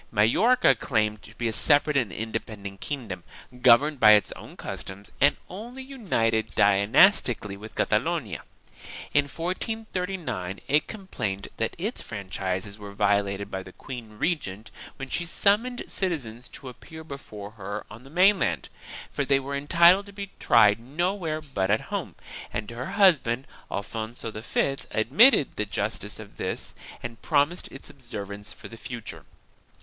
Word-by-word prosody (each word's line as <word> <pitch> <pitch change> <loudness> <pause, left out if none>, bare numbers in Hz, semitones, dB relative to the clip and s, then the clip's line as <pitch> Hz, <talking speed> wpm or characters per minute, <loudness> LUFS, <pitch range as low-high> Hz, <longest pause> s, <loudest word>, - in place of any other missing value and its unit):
Majorca 190 - +4
claimed 105 -3 0
to 110 - -14
be 120 - -1
a 115 - 0
separate 145 +4 +4
and 120 -7 +1
independent 105 -3 -5
kingdom, 130 -11 -5 0.4
governed 130 +4 +6
by 105 -2 +9
its 105 -3 +4
own - - -10
customs 100 +1 -7
and 145 +1 +5
only 240 +8 -8
united 115 - -1
dynastically 100 - +4
with 110 +2 -11
Catalonia. - - 0 0.7
In 145 -1 +4
1439 180 - -3
it 150 +2 +3
complained 110 - -4
that 115 - -1
its 210 +8 -3
franchises 100 -1 -4
were 100 -1 -9
vio 100 0 +3
lated 100 0 -5
by 95 - -3
the 95 -1 -12
queen 115 -4 -9
regent 110 - -2 0.3
when 135 -1 -6
she 175 - -1
summoned 210 +8 +3
citizens 125 - -2
to 135 - -9
appear 160 +5 -11
before 110 -9 -9
her 100 -1 -6
on 110 +3 -10
the 135 - -15
mainland, 175 - +3 0.4
for 145 - 0
they 135 0 +3
were 140 +1 -4
entitled 170 +7 +5
to - - -10
be 200 -1 -7
tried 105 -2 +5
nowhere 160 - -2
but 100 -10 -2
at 110 +2 +4
home, - - -3 0.4
and 105 +1 -4
her 120 +2 -5
husband 135 - +4 0.2
Alfonso 110 +3 -5
V 120 +5 -1
admitted 145 - +5
the 105 - 0
justice 105 0 -3
of 105 -2 -11
this - - -3 0.3
and 115 -1 -7
promised 150 +3 +1
its 135 - -10
observance 105 -5 -8
for - - -10
the 115 - -11
future. 120 -1 -8
120 Hz, 145 wpm, -26 LUFS, 105-165 Hz, 0.7 s, by